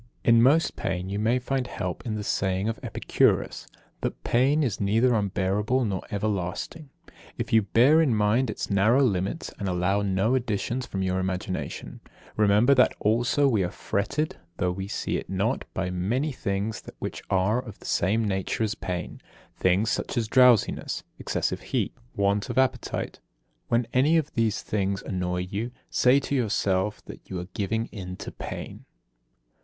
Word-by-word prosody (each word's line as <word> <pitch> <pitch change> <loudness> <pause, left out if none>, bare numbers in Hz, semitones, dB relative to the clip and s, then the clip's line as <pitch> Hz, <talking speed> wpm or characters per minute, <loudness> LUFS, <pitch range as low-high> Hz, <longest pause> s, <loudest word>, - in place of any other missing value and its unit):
In 115 -1 +6
most 145 +7 +4
pain 95 -1 -3
you 100 +1 -2
may 115 +4 +2
find 130 0 -2
help 90 -6 -4
in 110 - -1
the 105 - -3
saying 95 0 0
of 115 0 -2
Epicurus, - - +1 0.3
that - - -4
"pain 135 +6 +3
is 120 -8 -1
neither 115 +5 +3
unbearable 105 +4 +1
nor 95 -3 -2
everlasting, 105 - -3 0.5
if - - -4
you 110 - +7
bear 125 +10 +5
in 135 -8 +2
mind 110 +4 +2
its - - -3
narrow 110 +8 +4
limits, 95 -5 -1
and 100 - -2
allow 90 +3 +1
no 100 +4 +1
additions 120 0 -1
from 95 -1 -3
your 95 0 0
imagination." 95 +1 -4 0.4
Remember 105 +5 +5 0.3
also 120 +7 +2
that 140 - +5
we 110 -6 +2
are 90 - -1
fretted, 140 - -2 0.2
though 90 0 +1
we 95 +2 -5
see - - -2
it - - -7
not, 100 +7 -1
by 95 -1 -1
many 115 - 0
things 100 -3 -2 0.2
which - - -5
are 95 +6 +2
of 110 -5 -10
the - - -16
same 105 +5 +1
nature 95 +3 -1
as 110 -1 0
pain, 90 -5 -5 0.3
things 95 +5 +2
such - - -2
as 115 -2 +1
drowsiness, 125 -2 +3 0.2
excessive - - -2
heat, - - -1 0.2
want 100 +2 +1
of 120 - -4
appetite. 130 0 0 0.5
When 120 +1 +2
any 145 +6 +4
of 155 -3 -1
these 115 -3 0
things 100 -2 -1
annoy 90 -1 -2
you, 100 +6 -3 0.2
say 125 +2 +5
to 140 - -4
yourself 105 -5 0
that - - -10
you 95 - -3
are 90 +1 -7
giving 110 +3 -1
in 90 -3 -6
to - - -7
pain. - - -7
105 Hz, 165 wpm, -26 LUFS, 95-120 Hz, 0.5 s, you